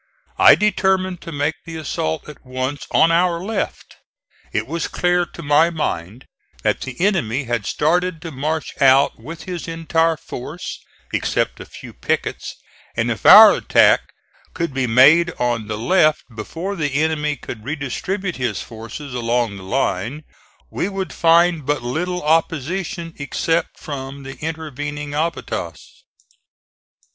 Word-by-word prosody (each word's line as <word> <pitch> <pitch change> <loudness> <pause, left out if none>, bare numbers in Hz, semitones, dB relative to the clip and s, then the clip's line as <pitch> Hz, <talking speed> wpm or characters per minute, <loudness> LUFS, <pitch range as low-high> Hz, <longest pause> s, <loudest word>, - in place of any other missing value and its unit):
I - - +9
determined 190 -3 +1
to 165 - -8
make 145 +1 0
the 165 - -8
assault 80 - -3
at 150 - -12
once 130 +2 -4
on 165 - +4
our 170 0 +2
left. 210 0 -4 0.5
It - - -1
was 165 +2 -3
clear 175 0 +1
to 170 - -11
my 150 +3 +4
mind 120 - -4 0.4
that - - +1
the 130 -1 -7
enemy 145 - 0
had 120 -4 -2
started 175 +2 +1
to 165 - -6
march 155 +3 -3
out 135 -1 +5
with 160 +8 -9
his 180 -2 -6
entire 165 0 +1
force, 150 +5 -7 0.3
except - - -1
a - - -9
few - - -11
pickets, - - -3 0.4
and - - +1
if - - -1
our - - +11
attack - - +4 0.5
could 170 -4 -2
be 130 -1 0
made 150 +9 +6
on 120 -3 -1
the 105 0 -3
left 155 - +3
before 170 - -5
the 145 -6 -2
enemy 150 -1 +1
could 115 -4 -9
redistribute 160 - -3
his 120 -8 -2
forces 115 +5 -8
along 120 -3 0
the - - -10
line, 120 +5 -2 0.5
we 190 - -2
would 195 -1 -4
find 170 -1 +4
but 145 -2 -1
little 180 +8 -2
opposition 165 +3 -1
except 165 +4 -1
from 140 -1 -7
the 135 0 -8
intervening 150 -2 -5
abatis. 155 +1 -3
150 Hz, 140 wpm, -20 LUFS, 130-170 Hz, 0.5 s, our